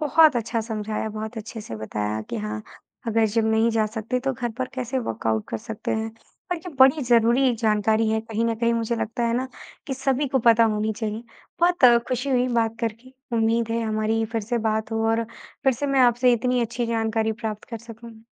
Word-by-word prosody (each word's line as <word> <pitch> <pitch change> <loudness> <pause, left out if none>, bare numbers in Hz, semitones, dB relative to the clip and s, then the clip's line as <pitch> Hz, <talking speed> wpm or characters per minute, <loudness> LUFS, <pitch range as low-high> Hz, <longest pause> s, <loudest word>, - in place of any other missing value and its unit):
बहुत 310 -2 +5
अच्छा 230 0 -1
समझाया, 215 -1 -3
बहुत 220 +2 -6
अच्छे 220 +1 -7
से 115 - -7
बताया 105 0 -3
कि 115 - -2
हाँ, 105 0 -4 0.4
अगर 225 0 +3
जिम 220 +1 +1
नहीं 220 +1 +3
जा 220 -1 +1
सकते, 220 +3 -3
तो 270 +1 -1
घर 240 -1 -3
पर 255 - -1
कैसे 255 +1 -2
वर्कआउट 110 - -1
कर 115 - -2
सकते 220 - -6
हैं 220 0 -2 0.4
और - - -1
ये 360 +2 -9
बड़ी 270 +3 +6
ज़रूरी 240 +2 +4
जानकारी 220 +1 +2
है। 220 0 +1
कहीं 225 0 -2
न 230 -1 +1
कहीं 235 +1 +1
मुझे 230 0 -1
लगता 230 +2 -3
है 230 - 0
ना, 260 +1 -2 0.4
कि 270 - -2
सभी 270 +1 0
को 265 - +1
पता 230 -1 +5
होनी 215 0 0
चाहिए। 215 +1 -4 0.4
बहुत 350 -5 +3 0.2
खुशी 255 +2 -1
हुई 250 -1 +3
बात 230 -2 0
करके। 230 +3 -4 0.2
उम्मीद 225 0 +2
है, 230 0 0
हमारी 220 0 0
फिर 225 - 0
से 235 +3 -1
बात 220 +1 -1
हो 225 0 0
और 230 0 +1 0.4
फिर 265 - +5
से 285 +4 -3
मैं 275 -1 +2
आपसे 245 0 +5
इतनी 250 +1 +1
अच्छी 235 +1 -2
जानकारी 225 -1 0
प्राप्त 215 -1 -4
कर 230 - -4
सकूँ। 230 0 -12
230 Hz, 210 wpm, -24 LUFS, 220-245 Hz, 0.4 s, बड़ी